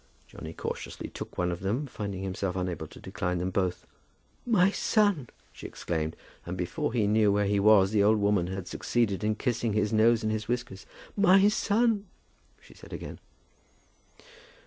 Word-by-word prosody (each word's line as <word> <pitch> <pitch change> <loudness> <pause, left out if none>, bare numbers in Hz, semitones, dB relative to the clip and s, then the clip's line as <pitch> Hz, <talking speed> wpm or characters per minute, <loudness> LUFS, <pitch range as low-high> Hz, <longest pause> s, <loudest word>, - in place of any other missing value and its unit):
Johnny 80 - -9
cautiously - - -6
took - - -8
one 90 0 0
of 85 - -4
them, 110 +10 -1
finding 100 -7 -5
himself 95 -1 -3
unable 90 -4 -3
to - - -14
decline 90 0 -3
them 90 +2 -2
both. 90 -2 -1 0.6
"My 195 -5 +4
son!" 205 - +1 0.2
she - - -8
exclaimed; 80 -2 -3 0.3
and 90 +1 -5
before 120 - -2
he 115 -3 +1
knew 105 0 +3
where 100 0 +2
he 100 0 +1
was 100 -1 +5
the 105 -2 +3
old 110 +2 +4
woman 100 -4 +2
had 95 -1 -5
succeeded 110 -5 -1
in 105 0 +1
kissing 120 -3 -1
his 105 0 0
nose 115 +1 +4
and 110 - 0
his 110 0 -3
whiskers. 120 -5 -4 0.3
"My 195 0 +6
son!" 210 -1 +1 0.5
she - - -18
said - - -13
again. - - -7
105 Hz, 170 wpm, -28 LUFS, 95-120 Hz, 0.6 s, My